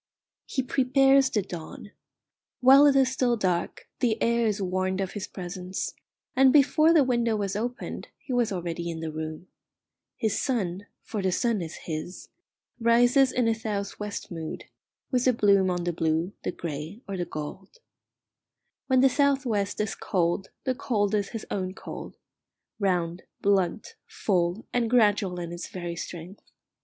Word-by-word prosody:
He 265 - -1
prepares 270 +1 +4
the 210 -5 0
dawn. 180 +3 -8 0.7
While 270 +3 +8
it 280 - +4
is 265 -1 +4
still 250 -2 +1
dark 180 -4 -1
the 235 -3 +1
air 235 0 +2
is 210 -1 0
warned 185 0 -1
of 190 -1 -2
his 205 -3 -5
presence, 180 0 -5 0.4
and 265 0 +6
before 305 +3 +5
the 320 -4 +6
window 235 -3 +1
was 200 -2 -2
opened 240 +4 -4
he 260 - -6
was 240 -3 +2
already 170 -2 -3
in 165 -1 -4
the 160 -1 -4
room. 155 +2 -6 0.7
His 220 -2 0
sun 200 -7 -2 0.2
for 215 -3 -4
the 190 -1 +1
sun 225 +1 +1
is 165 -1 -6
his 160 +3 -6 0.5
rises 245 +3 +4
in 245 -2 +1
a 225 - +3
south 210 -3 -4
west 210 -2 -5
mood, 165 -2 -6 0.5
with 250 -1 +2
a 255 - +5
bloom 200 -4 +4
on 175 -1 -1
the 175 0 -1
blue, 165 +3 0
the - - -2
grey, 165 - -6
or 195 - -4
the 180 - -1
gold. 170 - -7 1.1
When 260 -1 +4
the 270 - +7
south 280 0 +2
west 205 -4 -1
is 210 -1 -1
cold, 175 +1 -1
the 260 - 0
cold 210 -5 0
is 205 -2 0
his 225 -2 -6
own 185 -1 -2
cold - - -8 0.6
round, 180 -3 0 0.2
blunt, 200 0 +1
full, 180 +1 0
and 240 -2 +1
gradual 205 -6 +3
in 170 -1 -5
its 175 0 -6
very 175 -2 -5
strength. 175 +3 -8
200 Hz, 165 wpm, -27 LUFS, 180-245 Hz, 1.1 s, While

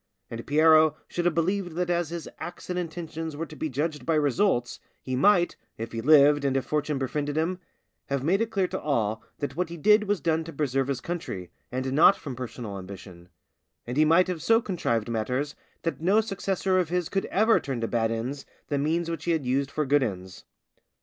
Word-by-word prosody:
And 115 0 -7
Piero 155 +1 +5
should 175 - -3
have 175 -3 +2
believed 180 +1 0
that 175 +1 -1
as 175 -2 0
his 170 -1 -6
acts 175 +1 -7
and 180 - -1
intentions 165 -2 -5
were 165 - -3
to 155 - -12
be 155 - -3
judged 150 +1 -2
by 160 +5 +1
results, 145 -3 +1 0.2
he 130 - -4
might, 175 +5 +4 0.2
if 115 +1 -5
he 115 - -4
lived 145 +1 +6
and 135 -1 +1
if 135 - -2
fortune 150 -1 -1
befriended 145 +3 -2
him, 175 +3 0 0.5
have 140 -1 -1
made 190 +8 +2
it 230 - 0
clear 195 -4 +1
to 190 - -4
all, 110 -7 0 0.2
that 140 -2 -4
what 180 0 -1
he 170 - -7
did 210 +6 +4
was 205 -2 0
done 160 +1 0
to 165 - -8
preserve 135 -2 0
his 135 -3 -2
country, 130 - -5 0.2
and 130 +1 -2
not 160 +7 +7
from 135 -4 -7
personal 120 -5 -6
ambition; 95 -2 -11 0.6
and 120 - -4
he 155 - +5
might 165 +4 +5
have 180 -3 -3
so 225 +7 +4
contrived 160 - -1
matters 125 +6 -2 0.3
that 165 -2 -2
no 195 +6 +4
successor 195 -3 0
of 175 -3 0
his 180 -1 0
could 195 - -1
ever 220 +3 +3
turn 135 -4 -4
to 115 - -1
bad 115 -1 +1
ends 120 +5 -3 0.3
the 145 - 0
means 165 +4 0
which 165 -2 -4
he 170 - +2
had 155 -5 -1
used 135 +2 0
for 150 +1 -1
good 145 +2 +3
ends. 95 -6 -5
150 Hz, 215 wpm, -26 LUFS, 130-175 Hz, 0.6 s, not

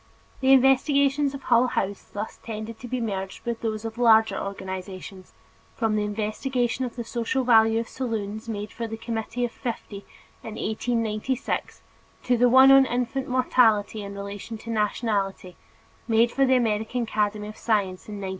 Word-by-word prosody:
The 265 0 +3
investigations 275 +1 +4
of 275 - -9
Hull 240 +2 +4
House 200 -4 -2
thus 210 +1 -6
tend 220 0 -6
to 245 - -8
be 255 +1 -2
merged 195 -4 -4
with 235 -1 -3
those 220 -1 -3
of 225 +1 -6
larger 225 -2 +5
organizations, 190 -1 -7 0.4
from 225 -3 0
the 210 - +1
investigation 225 +4 -1
of 245 - -7
the 240 - -4
social 240 +3 -1
value 225 -2 +5
of 230 - -4
saloons 220 -3 -4
made 210 -1 -4
for 230 0 -5
the 225 0 -6
Committee 230 +1 -3
of 240 - -5
Fifty 230 -5 -6 0.4
in 220 - -8
1896, 230 +3 -2 0.4
to 250 - +2
the 245 +1 +4
one 260 +2 +8
on 270 -1 +7
infant 250 +2 -2
mortality 230 -5 +2
in 200 0 -7
relation 200 +3 -6
to 230 +2 -7
nationality, 205 -4 -1 0.5
made 230 +1 +3
for 275 -1 +2
the 260 - +4
American 225 0 0
Academy 210 -1 -1
of 215 - -8
Science 200 -5 -1
in 210 - -6
1909. 195 -2 -5
225 Hz, 165 wpm, -25 LUFS, 210-245 Hz, 0.5 s, one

